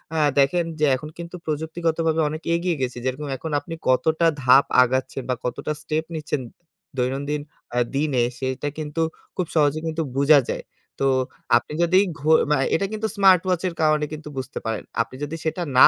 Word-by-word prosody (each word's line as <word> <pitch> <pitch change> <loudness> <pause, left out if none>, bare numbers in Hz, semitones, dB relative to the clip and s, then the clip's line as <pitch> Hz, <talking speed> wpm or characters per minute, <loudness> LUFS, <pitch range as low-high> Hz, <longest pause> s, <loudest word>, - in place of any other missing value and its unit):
আ - - 0 0.2
দেখেন 165 +5 +3
যে, 155 - +4
এখন 150 +4 -7
কিন্তু 170 +1 -7
প্রযুক্তিগতভাবে 160 +1 0
অনেক 155 +2 -5
এগিয়ে 170 0 0
গেছি। 125 -1 -2
যেরকম 130 +3 -2
এখন 160 +4 -6
আপনি 165 - -8 0.2
কতটা 160 +6 +3 0.2
ধাপ 130 +2 +7 0.2
আগাচ্ছেন 130 +1 -1
বা 125 - +2
কতটা 125 +4 -2
স্টেপ 155 0 -1
নিচ্ছেন 150 -3 -2 0.6
দৈনন্দিন 140 +4 -1 0.3
আ - - 0 0.2
দিনে, 140 -4 +2 0.2
সেটা 130 +2 -2
কিন্তু 155 +1 -3 0.3
খুব 180 - -1
সহজে 150 0 +3
কিন্তু 160 0 -2 0.2
বুঝা 145 +1 +6
যায়। - - -3 0.4
তো 135 - +2 0.5
আপনি 140 - -5
যদি, 180 +2 +5 0.2
ঘু 150 +4 -1 0.2
মা 150 - +4 0.2
এটা 195 - +1
কিন্তু 220 0 -1
স্মার্ট 190 -3 +6
ওয়াচ 180 -2 +1
এর 175 - -3
কারণে 155 -1 +3
কিন্তু 155 0 -8
বুঝতে 130 0 -4
পারেন। 110 -1 -2 0.2
আপনি 125 - -5
যদি 145 +3 -4
সেটা 160 +3 -1 0.2
না - - +10
155 Hz, 180 wpm, -23 LUFS, 135-165 Hz, 0.6 s, না